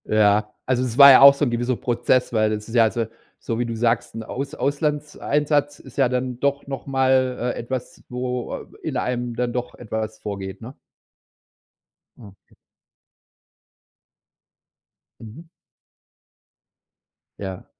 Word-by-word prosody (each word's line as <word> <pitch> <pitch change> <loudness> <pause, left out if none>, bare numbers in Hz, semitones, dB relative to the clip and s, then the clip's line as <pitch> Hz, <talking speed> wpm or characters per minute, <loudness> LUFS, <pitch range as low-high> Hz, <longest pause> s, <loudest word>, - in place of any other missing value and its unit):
Ja. 105 0 +2
Also, 130 -1 +1
es 125 -2 -4
war 140 -1 +11
ja 130 - +8
auch 140 0 +10
so 140 +1 0
'n 120 - -1
gewisser 120 +2 -1
Prozess, 120 +1 0
weil 110 -1 +2
das 105 0 -4
ist 115 - -7
ja 115 - +6
also, 115 +1 0 0.3
so 115 0 -4
wie 120 - 0
du 115 -1 -4
sagst, 115 0 0
'n 115 - -5
Aus 135 +5 -5
Auslandseinsatz 145 0 -1
ist - - -15
ja 135 -3 +3
dann 125 -1 -3
doch 140 +1 0
noch 135 -1 -6
mal, 130 -1 +2 0.2
äh, - - -6
etwas, 125 +1 -6
wo 125 0 -4 0.3
in - - -3
einem 120 -1 -2
dann 120 0 -2
doch 125 0 -4
etwas 110 -1 -5
vorgeht, 100 -1 -6
ne? 125 +5 -10 1.4
Okay. 100 -4 -17 2.7
Mhm. 115 +8 -11 2.0
Ja. 95 -2 -6
125 Hz, 140 wpm, -22 LUFS, 110-130 Hz, 2.7 s, war